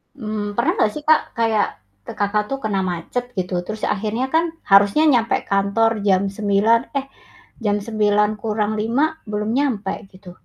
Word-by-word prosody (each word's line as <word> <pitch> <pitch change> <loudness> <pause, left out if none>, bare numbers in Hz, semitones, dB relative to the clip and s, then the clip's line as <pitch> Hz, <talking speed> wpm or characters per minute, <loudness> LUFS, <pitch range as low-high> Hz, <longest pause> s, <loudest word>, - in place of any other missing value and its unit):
Mmm, 215 -4 -4
pernah 235 - +2
nggak 210 - +2
sih 300 - -6
Kak 310 0 +5
kayak, 225 -3 +2 0.4
ke - - -6
Kakak 210 +1 0
tuh 275 0 -3
kena 205 -3 0
macet 175 +9 -4
gitu, 180 0 -3
terus 215 0 -6
akhirnya 215 +5 -1
kan, 325 +1 +4 0.3
harusnya 200 +9 +6
nyampe 235 -3 +2
kantor 200 +3 +2 0.2
jam 190 -1 +4 0.2
9:00, 210 +2 +3 0.2
eh 270 - -7 0.6
jam 205 0 +2
8:55 215 +3 +1 0.3
belum 210 +1 -2
nyampe, 220 -9 0 0.2
gitu. 185 -1 -13
215 Hz, 150 wpm, -21 LUFS, 205-230 Hz, 0.6 s, harusnya